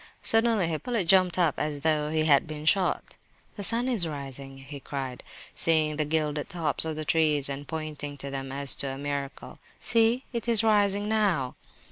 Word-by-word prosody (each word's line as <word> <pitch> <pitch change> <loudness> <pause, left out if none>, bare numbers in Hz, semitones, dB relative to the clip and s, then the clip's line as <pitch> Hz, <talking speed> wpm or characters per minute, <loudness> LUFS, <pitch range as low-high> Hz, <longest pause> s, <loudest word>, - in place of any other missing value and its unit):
Suddenly 225 -4 +2
Hippolyte 195 +6 -2
jumped 185 -1 +4
up 170 -5 +1
as 150 -1 -3
though 150 -1 +1
he 155 0 0
had 145 0 +4
been 155 -1 -7
shot. 185 +3 +1 0.4
"The 205 - -7
sun 230 +5 +2
is 220 -10 +2
rising," 135 -2 -8
he 140 +1 -10
cried, 135 -2 -6 0.3
seeing 155 -2 +3
the 155 - 0
gilded 150 -1 -1
tops 160 -3 +1
of 160 -1 -3
the 155 0 -5
trees, 150 -3 +2
and 140 +1 -5
pointing 150 -2 -5
to 140 0 -7
them 135 -1 -5
as 140 0 +1
to 140 - -1
a 135 0 -5
miracle. 140 -1 -6 0.2
"See, 230 +2 +2
it 235 0 -4
is 230 -2 +4
rising 205 -2 +2
now!" 195 -12 +1
155 Hz, 180 wpm, -27 LUFS, 140-195 Hz, 0.4 s, jumped